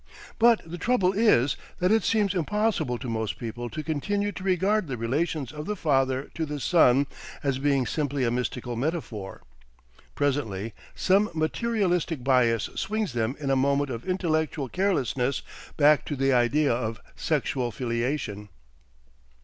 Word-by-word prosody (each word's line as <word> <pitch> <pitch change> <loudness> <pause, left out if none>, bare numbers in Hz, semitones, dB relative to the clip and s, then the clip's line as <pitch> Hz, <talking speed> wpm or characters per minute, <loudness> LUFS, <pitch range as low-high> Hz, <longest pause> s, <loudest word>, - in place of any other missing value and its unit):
But 235 0 +5
the 170 +2 -7
trouble 195 -6 +2
is 195 - +3 0.2
that 180 +2 +2
it 220 0 +4
seems 210 -3 +2
impossible 185 - 0
to 130 - -7
most 110 -2 -2
people 120 +1 -5
to 155 - -5
continue 200 +7 -1
to 185 - -8
regard 190 +1 +1
the 130 -3 -4
relations 135 +3 -1
of 150 0 -7
the 210 - -1
Father 135 -5 0
to 165 - -3
the 150 -1 -4
Son 140 -3 +4 0.4
as 135 -2 0
being 140 -2 +2
simply 145 +2 -1
a 120 - +1
mystical 125 0 -3
metaphor. 120 - -4 0.7
Presently 115 -8 -1 0.2
some 200 +3 +3
materialistic 175 - 0
bias 120 -4 +3
swings 210 - -2
them 120 +2 -1
in 140 -2 -1
a - - +4
moment 140 +1 +1
of 115 -1 -5
intellectual 160 -6 0
carelessness 140 -8 0 0.3
back 150 0 +5
to 145 - -3
the 135 0 +2
idea 125 +3 +3
of 115 -3 -3 0.2
sexual 125 -2 -1
filiation. 115 -3 -3
145 Hz, 150 wpm, -26 LUFS, 125-180 Hz, 0.7 s, But